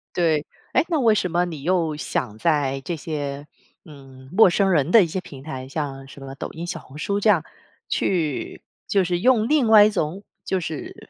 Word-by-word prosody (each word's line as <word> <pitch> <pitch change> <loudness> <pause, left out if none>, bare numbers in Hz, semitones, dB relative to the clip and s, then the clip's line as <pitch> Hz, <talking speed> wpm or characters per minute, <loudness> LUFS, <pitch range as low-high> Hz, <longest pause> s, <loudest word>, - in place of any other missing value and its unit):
对， 160 -4 +1 0.3
诶， - - +2
那 335 - 0
为 235 -6 +4
什 190 -3 0
么 175 +1 +1
你 165 -5 -5
又 170 -2 +1
想 115 -7 -3
在 140 0 +1
这 175 - -2
些 145 -2 -5 0.4
嗯， 135 -3 -14
陌 195 +1 +6
生 195 +2 +2
人 150 -4 +2
的 220 +1 +7
一 - - -1
些 175 +4 -3
平 140 -7 -11
台， 130 -4 -7
像 135 -2 -5
什 140 - -13
么 135 0 -8
抖 - - -5
音、 165 +2 -6
小 170 -1 -5
红 140 -1 -14
书 200 +6 -1
这 215 - +2
样 180 -7 +4 0.5
去 160 -7 -1 0.2
就 195 -2 +2
是 175 -1 -1
用 235 +1 +3
另 295 -5 +3
外 220 -2 +8
一 210 - +5
种 185 0 -3 0.2
就 190 - 0
是 160 -3 -7
165 Hz, 220 characters per minute, -23 LUFS, 140-195 Hz, 0.5 s, 外